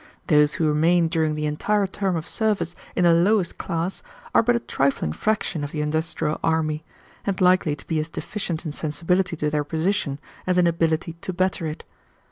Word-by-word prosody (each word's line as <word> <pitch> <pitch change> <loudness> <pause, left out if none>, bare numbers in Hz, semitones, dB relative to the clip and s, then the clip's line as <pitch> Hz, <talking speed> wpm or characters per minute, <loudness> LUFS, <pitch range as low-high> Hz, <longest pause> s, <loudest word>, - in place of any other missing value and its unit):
Those 150 -1 +5
who 160 - +1
remain 165 +3 +3
during 160 -2 +1
the 150 0 -2
entire 200 +7 +1
term 190 -1 -1
of 160 -1 -4
service 205 -6 0 0.2
in 180 - +2
the 170 -1 +6
lowest 180 +2 +2
class 170 +1 -2 0.3
are - - +6
but 240 +1 +2
a - - +2
trifling 135 - 0
fraction 210 - -1
of 145 - -3
the 150 - -2
industrial 155 0 -1
army, 155 -1 0 0.4
and 195 -2 -2
likely 180 -4 +4
to 145 - -15
be 160 -2 0
as 155 +1 -3
deficient 175 -2 -4
in 155 - -2
sensibility 170 +4 0
to 150 -1 -1
their 150 -1 +1
position 160 -1 -1 0.3
as 180 0 +2
in 180 - +5
ability 165 0 0
to - - -3
better 185 -2 0
it. 155 - -6
165 Hz, 190 wpm, -24 LUFS, 155-185 Hz, 0.4 s, the